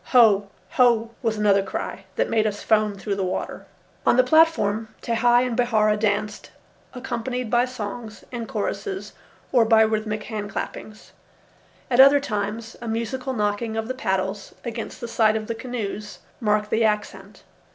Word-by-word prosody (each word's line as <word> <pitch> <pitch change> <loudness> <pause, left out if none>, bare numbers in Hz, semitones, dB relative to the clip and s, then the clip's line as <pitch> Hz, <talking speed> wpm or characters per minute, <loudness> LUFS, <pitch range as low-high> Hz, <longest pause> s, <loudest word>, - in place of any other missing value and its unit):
"Hoé! 210 -5 +6 0.3
Hoé!" 235 -2 +4
was 225 -3 0
another 205 -2 +4
cry 195 0 -5
that - - +1
made 220 -1 +2
us 205 -1 -4
foam 215 -2 +2
through 200 +1 -3
the 195 -1 -1
water. 185 0 -4 0.4
On - - +3
the 255 - +6
platform 250 -8 +3 0.2
Tehei 240 +1 +3
and 245 -2 -2
Bihaura 220 -3 +2
danced, 210 0 -1 0.5
accompanied 250 -1 -4
by 240 0 +4
songs 220 -2 -7
and 235 -2 -5
choruses 390 -2 -4 0.4
or 245 -3 +5
by 220 0 +5
rhythmic 215 -1 -1
hand 210 -3 -5
clappings. 215 0 -7 0.8
At 245 - +2
other 275 +2 +8
times 220 -2 -4
a 235 - -6
musical 235 +4 -3
knocking 215 0 -1
of 220 0 -2
the 255 - -2
paddles 195 -4 -2
against 230 -1 -6
the 235 - -4
sides 220 -1 +2
of 215 - -5
the 230 - -3
canoes 215 -3 -5 0.2
marked 210 -1 +1
the 225 - +2
accent. 210 -1 -2
220 Hz, 160 wpm, -23 LUFS, 210-240 Hz, 0.8 s, other